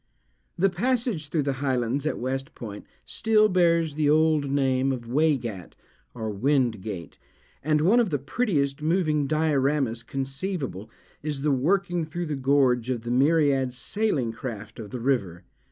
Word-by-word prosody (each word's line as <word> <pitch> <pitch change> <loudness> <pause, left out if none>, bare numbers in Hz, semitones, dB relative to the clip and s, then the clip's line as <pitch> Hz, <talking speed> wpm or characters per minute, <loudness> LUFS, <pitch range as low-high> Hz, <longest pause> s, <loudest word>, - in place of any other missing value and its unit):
The 195 +2 +3
passage 225 - -1
through 150 +1 0
the 140 0 0
highlands 130 +1 0
at - - -1
West 135 +4 -4
Point 105 -3 -8 0.2
still 220 -1 +3
bears 170 -4 +2
the 150 0 +1
old 155 -2 +3
name 135 -1 +1
of 125 -3 -4
Wey 150 +4 +3
gat, 105 -9 -7 0.4
or 110 -2 -3
Wind 120 -1 +1
gate; 95 -5 -7 0.4
and 150 +1 +1
one 200 +10 +4
of 230 -5 +2
the 145 - 0
prettiest 140 - -1
moving 155 -3 +1
dioramas 140 -5 +1
conceivable, 135 - -4 0.3
is 145 -2 -4
the 150 - +2
working 175 +6 +1
through 175 +3 -4
the 150 -2 -3
gorge 130 -3 +2
of 120 -3 -2
the 120 - -3
myriad 135 -1 +2
sailing 150 - -1
craft 110 -2 -7
of 105 -2 -7
the 125 - -5
river. 100 -9 -1
140 Hz, 155 wpm, -26 LUFS, 125-160 Hz, 0.4 s, one